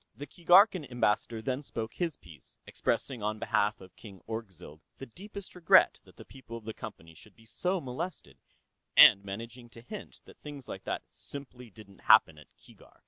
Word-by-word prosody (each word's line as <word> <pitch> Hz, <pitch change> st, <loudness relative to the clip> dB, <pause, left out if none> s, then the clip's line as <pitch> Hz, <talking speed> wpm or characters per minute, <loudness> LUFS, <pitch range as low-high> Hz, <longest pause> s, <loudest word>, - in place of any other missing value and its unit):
The 145 Hz, -, -7 dB
Keegarkan 180 Hz, +1 st, +4 dB
Ambassador 115 Hz, -1 st, 0 dB
then 130 Hz, +3 st, -2 dB
spoke 115 Hz, -5 st, -5 dB
his 170 Hz, -4 st, -3 dB
piece, 80 Hz, -6 st, -16 dB
expressing 130 Hz, -5 st, -1 dB
on 105 Hz, +1 st, -2 dB
behalf 105 Hz, -1 st, 0 dB
of 95 Hz, -1 st, -15 dB
King 100 Hz, -4 st, -13 dB
Orgzild 95 Hz, -9 st, -7 dB, 0.2 s
the 135 Hz, -, -8 dB
deepest 200 Hz, -, -10 dB
regret 175 Hz, -3 st, +5 dB
that -, -, -19 dB
the -, -, -12 dB
people 125 Hz, -3 st, -10 dB
of 115 Hz, -, -13 dB
the 110 Hz, -, -5 dB
Company 85 Hz, -9 st, -10 dB
should 100 Hz, +5 st, -16 dB
be 115 Hz, -, -21 dB
so 180 Hz, +11 st, -2 dB
molested, 135 Hz, -, -7 dB, 0.6 s
and 100 Hz, -, +9 dB
managing 115 Hz, +5 st, -8 dB
to 115 Hz, -, -14 dB
hint 200 Hz, -, -10 dB
that -, -, -17 dB
things 145 Hz, -3 st, -10 dB
like 95 Hz, -, -8 dB
that -, -, -3 dB
simply 130 Hz, -4 st, -11 dB
didn't 100 Hz, -2 st, -16 dB
happen 75 Hz, -1 st, +5 dB
at 75 Hz, -, -16 dB
Keegark. -, -, -20 dB
115 Hz, 180 wpm, -30 LUFS, 105-145 Hz, 0.6 s, and